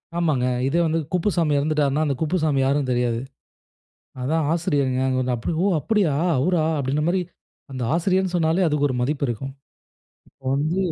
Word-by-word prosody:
ஆமாங்க. 155 -7 +1 0.2
இதே 165 +5 +1
வந்து 165 0 +1
குப்புசாமி 175 -4 +1
இறந்துவிட்டார்னா, 150 0 +1
அந்த 140 -2 0
குப்புசாமி 155 -3 +1
யாருன்னு 135 0 +1
தெரியாது. 120 -2 0 1.0
"அதான் 155 +4 0
ஆசிரியர்ங்க." 140 -6 0 0.3
அப்போ, 115 - -4
ஓ - - +3
அப்டியா! 195 -3 +1 0.2
அவுரா 170 +5 +2 0.2
அப்டின்ற 140 +2 -1
மாரி. 185 +2 +1 0.5
அந்த 130 -1 -4
ஆசிரியர்ன்னு 185 +2 +1
சொன்னாலே 170 +2 +2
அதுக்கு 150 -2 +1
ஒரு 130 - -2
மதிப்பு 140 +3 -1
இருக்கும். 125 +4 -4 0.8
இப்போ 135 - -30
வந்து 155 +6 0
150 Hz, 145 wpm, -23 LUFS, 135-170 Hz, 1.0 s, ஓ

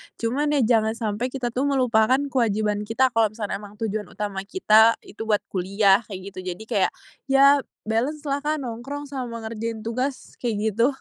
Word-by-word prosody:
Cuman 290 +6 0
ya 280 - +3
jangan 220 0 +3
sampe 225 +1 -2
kita 250 -2 -3
tuh 260 +4 0
melupakan 250 -3 +3 0.2
kewajiban 215 -4 +1
kita 255 +3 +2
kalo 225 -2 +3
misalkan 210 -1 -4
emang 205 0 -11
tujuan 215 -2 -3
utama 205 -1 -4
kita 225 - +5
itu 220 - -11
buat 210 -2 +2
kuliah 195 +1 +3
kayak 195 -3 -6
gitu 185 - -9 0.2
jadi 220 - -10
kayak 200 -4 +2 0.4
ya 275 +1 +6 0.2
balance-lah 275 +6 -1
Kak 300 +2 -1
nongkrong 255 +5 -5
sama 240 -4 -5
ngerjain 220 0 -4
tugas 255 +4 -4
kayak 235 -3 -1 0.2
gitu. 230 +4 +3
230 Hz, 170 wpm, -24 LUFS, 215-260 Hz, 0.4 s, ya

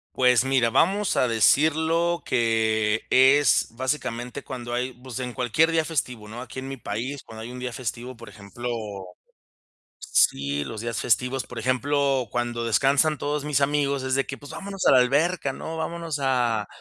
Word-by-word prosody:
Pues, 125 -1 +4
mira, 130 -3 +2
vamos 195 - +2
a 125 - +3
decirlo 160 +8 +2
que 110 -2 +1
es, 135 -1 +5
básicamente, 130 -1 -3
cuando 120 -2 -6
hay 125 +1 -2
pues 130 0 -8
en 125 -1 -4
cualquier 130 +7 +2
día 160 -1 +1
festivo, 125 -9 -3
¿no?, 115 +3 -8
aquí 130 +1 -8
en 135 - -7
mi 135 0 -6
país, 120 +6 -5
cuando 110 0 -10
hay 120 - -7
un 125 - -8
día 125 -1 -4
festivo, 120 +1 -5
por 115 - -12
ejemplo 110 +4 -8 1.3
Sí, 70 +1 +1
los 110 -1 -6
días 115 -3 -3
festivos, 125 +3 0
por 120 - -8
ejemplo, 135 +2 +1
cuando 120 -1 -2
descansan 140 +7 +3
todos 145 0 -2
mis 145 -2 +1
amigos, 140 -1 +1
es 130 0 0
de 135 - +1
que: 140 - -6
"Pues 145 - -12
vámonos 195 -1 -5
a - - +7
la 130 - +7
alberca, 140 +4 +1
¿no?, 160 +3 -6
vámonos 165 -2 -4
a 120 -6 +1
130 Hz, 175 wpm, -24 LUFS, 120-145 Hz, 1.3 s, a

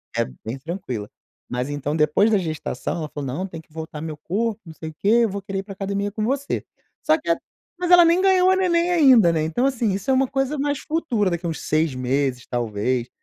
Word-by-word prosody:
é - - +1 0.2
bem 115 +4 -4
tranquila 130 - -5 0.4
mas 125 +2 -2
então 145 +1 -2
depois 155 +8 +3
da 210 - +4
gestação 155 -4 -3
ela 155 -2 -4
falou 145 -1 -6
não 160 +10 -3
tem 165 -4 -8
que 155 -1 -18
voltar 160 -1 -6
meu 155 -1 -5
corpo, 215 +7 -2
não 160 - -10
sei 160 0 -7
o - - -11
quê, 195 - -5 0.2
eu 225 - +2
vou 200 +1 -4
querer 195 0 -4
ir - - -4
pra 195 -1 -9
academia 200 +1 -2
com 215 +1 -3
você, 275 +4 -1 0.4
só 310 +1 +4
que 310 - -7
a - - +2 0.4
mas 360 - -1
ela 355 -1 +8
nem 340 +2 +4
ganhou 375 -1 +5
a - - +4
neném 355 -2 +2
ainda, 260 - +6
né. 160 - +1
Então 160 +12 0
assim, 245 -5 +1
isso 195 +6 -1
é - - +4
uma 265 0 +3
coisa 270 +3 -1
mais 285 0 0
futura, 250 - 0
daqui 170 0 -2
uns 165 - -4
6 155 -3 +1
meses 130 0 -1
talvez, 120 +1 -1
195 Hz, 235 wpm, -23 LUFS, -, 0.4 s, ela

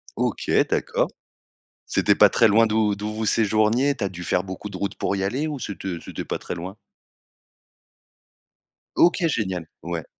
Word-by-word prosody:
OK, - - -2 0.2
d'accord. - - 0 0.8
C'était - - +2
pas - - +7
très 115 - +4
loin 110 +2 +5
d'où 105 -1 +1
d'où 105 +1 -4
vous 110 0 -3
séjourniez? 110 +6 +2
Tu 105 - -4
as 95 - 0
dû 90 -1 -8
faire 90 +1 0
beaucoup 95 +2 -7
de 95 - -7
routes 100 +1 -3
pour 100 - -1
y 95 - -2
aller 130 +10 -1
ou 150 -3 -4
c'était 95 -4 -5
c'était - - -6
pas - - -3
très - - -5
loin? 90 +3 -7 2.2
OK, 170 0 +4
génial. 95 - -2 0.2
Ouais. 85 -3 -4
105 Hz, 170 wpm, -23 LUFS, 95-115 Hz, 2.2 s, pas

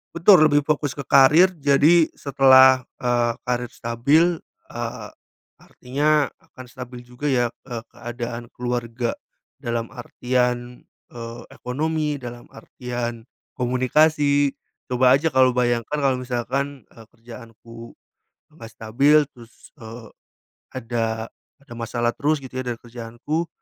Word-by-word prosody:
Betul 170 0 +6
lebih 145 - +5
fokus 150 -2 0
ke 140 +1 -8
karir, 160 +8 +6
jadi 150 +3 +4
setelah, 130 -1 +6 0.2
eee, 120 -1 +1 0.2
karir 125 -1 -2
stabil, 120 +7 +2 0.4
eee, - - -6 0.5
artinya 145 +3 0
akan 130 - -15
stabil 125 0 -9
juga 125 +4 -4
ya, 120 -2 +2 0.2
eee, 120 -3 -6
keadaan 120 0 -7
keluarga 120 -1 -3 0.4
dalam 115 -1 -4
artian, 125 -1 -3 0.2
eee, 115 0 -9
ekonomi, 150 +3 -3
dalam 120 -1 -9
artian 120 0 -6 0.3
komunikasi, 140 +3 +2 0.4
coba 125 +1 +5
aja 160 +4 0
kalau 130 -1 +3
bayangkan, 120 +3 0
kalau 130 -2 +1
misalkan, 130 +2 -3
eee, 115 - -15
kerjaanku 115 0 -13 0.5
nggak 150 -8 -12
stabil 140 +7 +2
terus, 120 -4 -17
eee, 115 0 -11 0.6
ada 115 -2 -3 0.3
ada 140 -4 -16
masalah 120 0 -2
terus 150 +2 0
gitu 130 -2 -12
ya - - -3
dari 120 -2 -5
kerjaanku, 120 +8 -5
125 Hz, 115 wpm, -22 LUFS, 120-140 Hz, 0.6 s, Betul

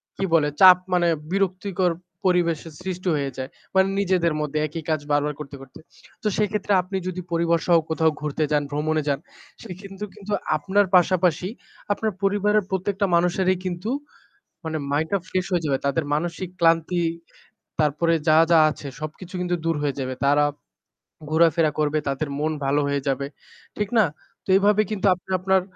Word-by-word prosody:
কি - - -4
বলে 155 -3 +4
চাপ 185 -1 +10 0.2
মানে 175 -1 +3 0.2
বিরক্তিকর 190 -1 0 0.4
পরিবেশের 170 -3 0
সৃষ্টি 185 0 -3
হয়ে 140 -2 -2
যায়। 130 +1 -4 0.3
মানে 190 0 +5
নিজেদের 180 -4 +2
মধ্যে 150 0 -3
একই 160 +1 -7
কাজ 155 -1 +1
বারবার 145 0 +1
করতে, 140 -1 -8
করতে। 135 -1 -13 0.4
তো - - +1
সেক্ষেত্রে 210 -1 0
আপনি 190 +2 -4
যদি 185 0 -4
পরিবারসহ 170 +1 +2
কোথাও 160 0 +2
ঘুরতে 150 +1 -1
যান 145 -1 +2
ভ্রমণে 155 +1 0
যান 140 -1 +1 0.4
সে 220 - -9
কিন্তু, 195 +1 -9
কিন্তু 205 +1 -9 0.3
আপনার 200 +5 +2
পাশাপাশি 180 -1 +3 0.5
আপনার 220 +1 -2
পরিবারের 205 +1 +2
প্রত্যেকটা 195 +1 -1
মানুষেরই 180 +2 +2
কিন্তু 180 +4 -3 0.8
মানে 160 -1 -3
মাইন্ডটা 160 +7 0
ফ্রেশ 185 0 -1
হয়ে 175 -2 +1
যাবে। 135 -2 +1
তাদের 145 +2 0
মানসিক 170 +3 -3
ক্লান্তি 165 +1 +3 0.8
তারপরে 155 +3 +2
যা, 155 0 +6
যা 165 - +7
আছে 150 - -8
সবকিছু 165 +4 -8
কিন্তু 175 0 0
দূর 165 -2 +1
হয়ে 140 -1 -1
যাবে 130 0 -3
তারা 145 +1 +4 0.9
ঘোরাফেরা 160 -1 +4
করবে 150 0 +1
তাদের 140 +2 -2
মন 155 +1 0
ভালো 140 +2 +2
হয়ে 140 0 0
যাবে, 135 +1 -1 0.5
ঠিক 210 -1 -1
না? 215 - +6 0.4
তো - - -26
এভাবে 210 +1 +4
কিন্তু 205 -2 -1
আপনি 180 +1 -17
আপনার 190 0 +2
170 Hz, 160 wpm, -23 LUFS, 150-190 Hz, 0.9 s, চাপ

